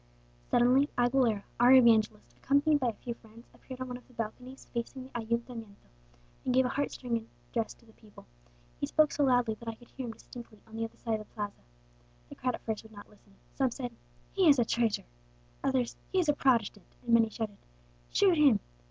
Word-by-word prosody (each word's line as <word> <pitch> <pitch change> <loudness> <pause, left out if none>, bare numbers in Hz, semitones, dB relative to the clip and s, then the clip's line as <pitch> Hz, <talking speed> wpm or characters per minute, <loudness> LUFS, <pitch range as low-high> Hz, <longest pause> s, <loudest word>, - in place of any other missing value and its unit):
"Suddenly 255 +4 +4
Aguilera, 245 -4 +2 0.2
our 245 +2 +7
evangelist, 225 -4 +4
accompanied 290 +2 +3
by 255 - 0
a 230 - 0
few 235 +3 -6
friends, 230 +1 -17
appeared 260 -1 -11
on 255 - -3
one 250 -1 -5
of 250 - -18
the 250 - -21
balconies 250 +4 -6
facing 240 +2 -4
the 260 - -12
Ayuntamiento, 230 - -4 0.5
and 255 - 0
gave 260 0 +5
a - - 0
heart 285 +2 -1
stirring 230 -3 -3 0.2
address 230 -2 -2
to - - -24
the 220 - -20
people. 215 -2 -17 0.5
He - - -1
spoke 310 -2 +3
so 290 - +1
loudly 245 -4 +3
that 235 - -12
I 225 - -3
could 240 +1 -19
hear 260 -2 -6
him 225 - -5
distinctly 230 -2 -12
on 220 - -13
the 225 0 -1
other 225 - -11
side 225 -2 -2
of 215 - -10
the - - -31
Plaza. 205 -2 -5 0.7
The - - -9
crowd 250 -1 -1
at - - -13
first 220 -2 -3
would 220 - -16
not 205 -1 -12
listen. 205 -1 -23 0.2
Some 265 -2 +1
said, 245 0 -5 0.4
'He 375 -4 +4
is 280 - +7
a 240 - +3
traitor!' 230 -1 0 0.6
others, 260 -3 0 0.2
'He 380 - 0
is 355 -3 +3
a - - +5
Protestant!' 230 -8 0
and 235 - +1
many 225 -1 +5
shouted, 220 -2 -5 0.5
'Shoot 380 -4 +4
him!' 275 -9 +6
240 Hz, 215 wpm, -30 LUFS, 225-260 Hz, 0.7 s, our